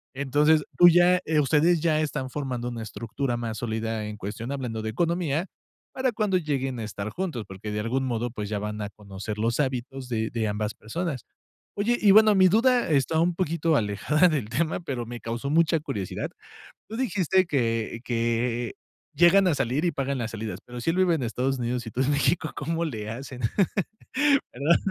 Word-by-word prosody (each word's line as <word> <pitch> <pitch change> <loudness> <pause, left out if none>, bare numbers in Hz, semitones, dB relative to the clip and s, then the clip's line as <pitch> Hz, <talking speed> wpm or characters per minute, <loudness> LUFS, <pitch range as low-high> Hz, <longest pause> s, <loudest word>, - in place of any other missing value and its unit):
Entonces, 145 +3 +3
tú 175 - +9
ya 175 +1 +5 0.2
ustedes, 160 +4 +3
ya 155 -2 +2
están 135 -4 -2
formando 125 -4 -3
una 120 -2 -5
estructura 115 +4 -3
más 115 -2 -4
sólida 110 -1 -2
en 105 0 -6
cuestión, 110 +5 -5
hablando 125 -5 -3
de 110 - -3
economía, 170 +3 0 0.5
para 260 -1 0
cuando 210 -4 +1
lleguen 135 -6 -2
a - - -3
estar 100 0 -5
juntos, 160 - -4
porque 95 +3 -7
de 105 - -2
algún 130 +5 -1
modo, 120 -1 -1
pues 105 -3 -5
ya 105 - -1
van 105 +1 -4
a 105 - -3
conocer 100 +1 -7
los 115 +3 0
hábitos 130 -1 -2
de 110 -2 -1
de 115 -2 -1
ambas 105 +1 -2
personas. 140 +4 -4 0.5
Oye, 230 +4 +1
y 205 - +6
bueno, 215 +1 +7
mi 185 -1 +6
duda 240 +2 +3
está 150 +2 +2
un 170 +1 +2
poquito 165 -2 +1
alejada 115 - +2
del 140 -10 -2
tema, 155 +7 0
pero 130 -8 -4
me 120 +1 -7
causó 120 +4 -4
mucha 165 0 +3
curiosidad, 100 - -4 0.6
tú 220 - -6
dijiste 190 - +2
que 115 -7 -1
que 120 0 -1 0.4
llegan 175 +5 +6
a 170 - +3
salir 130 +5 0
y 175 - +2
pagan 140 -1 -2
las 115 -1 -3
salidas, 110 -1 -5
pero 125 0 -8
si 165 - +1
él 175 - -3
vive 185 -3 +4
en 145 - -2
Estados 130 +3 -1
Unidos 120 0 -2
y - - -6
tú 125 - -1
en 135 +2 +2
México, 145 +3 +1
¿cómo 165 +3 -2
le 110 -8 -4
hacen? 125 +2 -7 1.1
¿Verdad? 145 +7 +3
130 Hz, 190 wpm, -26 LUFS, 115-165 Hz, 1.1 s, tú